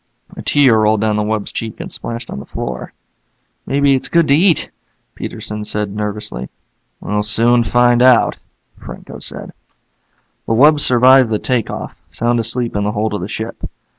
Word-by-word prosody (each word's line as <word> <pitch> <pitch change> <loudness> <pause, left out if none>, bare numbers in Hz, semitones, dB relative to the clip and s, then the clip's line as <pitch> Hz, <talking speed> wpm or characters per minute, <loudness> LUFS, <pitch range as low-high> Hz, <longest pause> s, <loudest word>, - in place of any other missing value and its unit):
A - - -7
tear 130 -6 +3
rolled 110 -1 +2
down 110 -1 +1
the 105 - 0
wub's 105 0 -2
cheek 110 -2 -5
and - - -6
splashed 115 +1 -6
on - - -6
the - - -9
floor. 65 0 -6 0.8
"Maybe 140 0 +2
it's 130 - -1
good 170 -2 +3
to - - +5
eat," 170 +3 +2 0.4
Peterson 105 0 -6
said 105 -1 -3
nervously. 105 - -4 0.5
"We'll 105 0 -1
soon 115 +3 +3
find 120 +1 +3
out," 125 -2 +4 0.5
Franco - - -10
said. - - -8 0.9
The - - +1
wub 145 +6 +5
survived 130 -1 +5
the 110 - 0
take 125 0 -1
off, - - -6
sound 120 +1 -1
asleep 115 +1 -2
in 105 - 0
the 105 +1 -1
hold 110 0 -1
of 105 - -3
the 90 - -4
ship. 110 +2 -6
115 Hz, 170 wpm, -16 LUFS, 105-125 Hz, 0.9 s, to